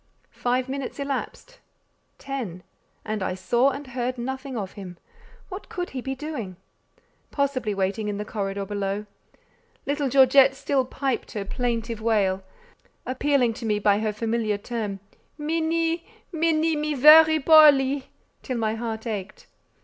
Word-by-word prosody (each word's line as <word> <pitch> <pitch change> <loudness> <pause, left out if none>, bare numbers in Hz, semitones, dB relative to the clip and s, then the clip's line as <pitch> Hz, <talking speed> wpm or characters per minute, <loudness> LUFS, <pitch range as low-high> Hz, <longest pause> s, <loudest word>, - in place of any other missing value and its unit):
Five 250 +1 -1
minutes 270 0 -5
elapsed—ten—and 265 - -7
I 185 - -2
saw 235 +8 +2
and 280 +2 -6
heard 250 0 -3
nothing 265 +1 -5
of 195 -3 -4
him. 185 -4 -10 0.5
What 380 +1 -8
could 355 0 -4
he 260 - -5
be 265 +1 -4
doing? 260 - -6 0.7
Possibly 265 -7 -1
waiting 195 +3 -1
in 205 -1 -2
the 210 - -4
corridor 200 -2 -3
below. 200 0 -3 0.8
Little 285 0 -1
Georgette 270 +1 +6
still 270 -1 0
piped 265 0 -3
her 205 -2 -4
plaintive 230 0 -3
wail, 200 -4 +1 0.6
appealing 260 -2 +1
to 235 - -10
me 210 -1 +1
by 205 0 +3
her 215 0 -1
familiar 220 -1 -1
term, 205 -3 -5 0.4
"Minnie, 330 +2 0 0.3
Minnie, 325 -1 +1
me 300 0 -1
very 315 +3 +8
poorly!" 285 -3 +5 0.3
till 255 -3 -4
my 220 -1 0
heart 225 0 -5
ached. 210 -4 -5
250 Hz, 135 wpm, -25 LUFS, 210-280 Hz, 0.8 s, very